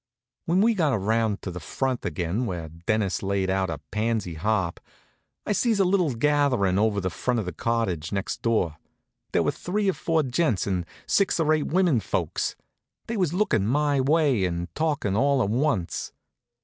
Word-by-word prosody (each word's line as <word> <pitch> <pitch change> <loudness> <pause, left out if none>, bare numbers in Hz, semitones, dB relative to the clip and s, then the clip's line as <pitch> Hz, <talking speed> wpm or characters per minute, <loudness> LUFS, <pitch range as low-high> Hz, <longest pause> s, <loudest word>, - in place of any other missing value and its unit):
When 175 +3 +3
we 230 +2 +4
got 160 -9 +1
around 110 +1 0
to 95 - -4
the 90 - -6
front 130 +5 -2
again, 85 +8 -1
where 85 -5 -4
Dennis 90 +2 -1
has - - -8
laid 95 -1 0
out 95 -1 0
a 80 - -3
pansy 110 -4 -1
harp, 95 +1 -1 0.7
I - - -1
sees 220 0 +2
a 195 - +4
little 180 -8 +2
gatherin' 125 -8 +2
over 105 -1 +2
in 95 - -2
front 125 +6 -1
of 105 - -3
the 90 - -4
cottage 95 -7 -1
next 100 -1 -3
door. 95 -9 +1 0.5
There - - +2
was - - 0
three 200 +3 -1
or 190 - +3
four 160 -2 0
gents, 130 - 0
and 90 -3 -2 0.2
six 200 -3 +2
or 155 -1 +3
eight 155 -2 0
women 175 -6 +3
folks. - - -2 0.5
They 230 - -4
was 180 -7 +1
lookin' 170 - +1
my 145 +2 +2
way, 140 -6 +3
and 85 0 -3
talkin' 145 -11 0
all 140 +4 +3
to 125 - +2
once. 115 - -1
115 Hz, 185 wpm, -25 LUFS, 95-150 Hz, 0.7 s, we